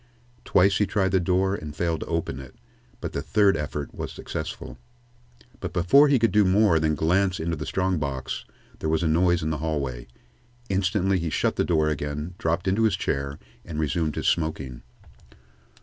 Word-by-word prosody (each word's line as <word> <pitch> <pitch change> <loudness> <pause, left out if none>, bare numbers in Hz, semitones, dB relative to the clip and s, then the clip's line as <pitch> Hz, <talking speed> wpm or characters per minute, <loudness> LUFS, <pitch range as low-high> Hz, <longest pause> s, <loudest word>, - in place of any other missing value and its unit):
Twice 95 +2 +4
he 105 - +2
tried 95 -3 +1
the 95 - +3
door 95 +2 +1
and 75 -6 -6
failed 85 -2 -1
to - - -6
open 80 -5 -2
it, 65 -1 -11 0.5
but - - -5
the 70 - -2
third 100 +6 +3
effort 75 -1 -4
was - - -5
successful. - - -6 0.8
But - - -5
before 95 - +5
he 140 -2 +4
could 115 -3 +2
do 105 +2 +5
more 95 -3 +4
than 80 0 +1
glance 90 +4 +1
into 85 +1 -1
the 75 0 -6
strong 95 -2 0
box, 70 -2 -4 0.4
there 80 - -2
was 80 +1 +1
a - - +2
noise 85 +1 +2
in 80 - -1
the 75 - -2
hallway. 70 -6 -3 0.6
Instantly 95 0 +1
he 85 0 -2
shut - - 0
the - - +1
door 80 -3 +2
again, 75 +3 -3
dropped 85 +3 -1
into 95 +4 +2
his 110 -4 +3
chair, 70 +1 -2 0.3
and 80 -3 -7
resumed 80 0 0
his - - -2
smoking. 75 -7 -1
85 Hz, 185 wpm, -25 LUFS, 75-95 Hz, 0.8 s, before